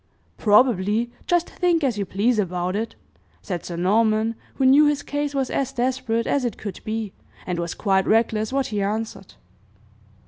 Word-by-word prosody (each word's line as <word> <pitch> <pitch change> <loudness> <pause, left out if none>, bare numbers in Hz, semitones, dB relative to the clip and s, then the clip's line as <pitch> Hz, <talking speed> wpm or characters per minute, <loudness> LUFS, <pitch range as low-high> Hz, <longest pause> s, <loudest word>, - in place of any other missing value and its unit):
"Probably 215 0 +3 0.2
just 350 -1 +2
think 345 -3 +1
as 245 -6 0
you 200 - -2
please 215 +4 +1
about 180 -1 -1
it!" 225 +2 -3 0.5
said 180 -4 -4
Sir 175 - -6
Norman, 215 +4 +2 0.2
who 270 - +1
knew 285 +3 +7
his 290 -1 0
case 290 0 -3
was 270 -2 -1
as 270 -1 -1
desperate 245 -2 -1
as 280 - 0
it 240 -4 -2
could 205 -4 -6
be, 215 -2 -3 0.3
and 180 -1 -2
was 170 -1 -3
quite 190 -2 +1
reckless 220 0 +2
what 275 0 0
he 205 - 0
answered. 210 -1 -4
225 Hz, 170 wpm, -23 LUFS, 200-260 Hz, 0.5 s, knew